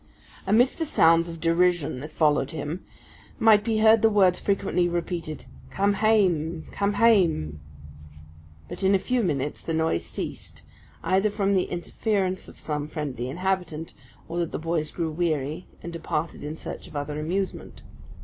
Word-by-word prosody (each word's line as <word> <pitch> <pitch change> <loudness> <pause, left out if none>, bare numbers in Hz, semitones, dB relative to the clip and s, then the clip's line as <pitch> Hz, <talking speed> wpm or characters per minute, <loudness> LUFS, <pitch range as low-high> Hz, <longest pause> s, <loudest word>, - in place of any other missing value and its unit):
Amidst 240 - +3
the 325 - 0
sounds 165 - +4
of 165 -1 -8
derision 170 -4 +1
that 150 +4 -8
followed 150 -3 +2
him, 160 +3 -5 0.5
might 215 -2 +5
be 225 -1 0
heard 220 0 +6
the 225 - +5
words 190 -4 +4
frequently 195 -3 +1
repeated 170 -2 -4 0.2
"Come 200 +1 +1
hame, 180 -7 +2
come 200 0 0
hame." 175 - +3 1.1
But - - -8
in 195 +1 +4
a - - +5
few 250 +6 0
minutes 145 -7 -2
the 165 - -3
noise 160 - +1
ceased, - - -7 0.4
either 195 +3 +2
from 200 -1 0
the 185 -2 +2
interference 185 +2 -2
of - - -13
some 150 -1 -3
friendly 135 -6 -4
inhabitant, 175 -1 -2 0.3
or 170 - -3
that 170 -2 -1
the - - -3
boys 160 -1 -1
grew 165 -1 -3
weary, 155 -1 -2 0.2
and 170 - -6
departed 165 -1 -3
in 150 +1 -5
search - - -8
of - - -14
other 145 +1 -3
amusement. 185 +5 -3
170 Hz, 160 wpm, -25 LUFS, 155-195 Hz, 1.1 s, heard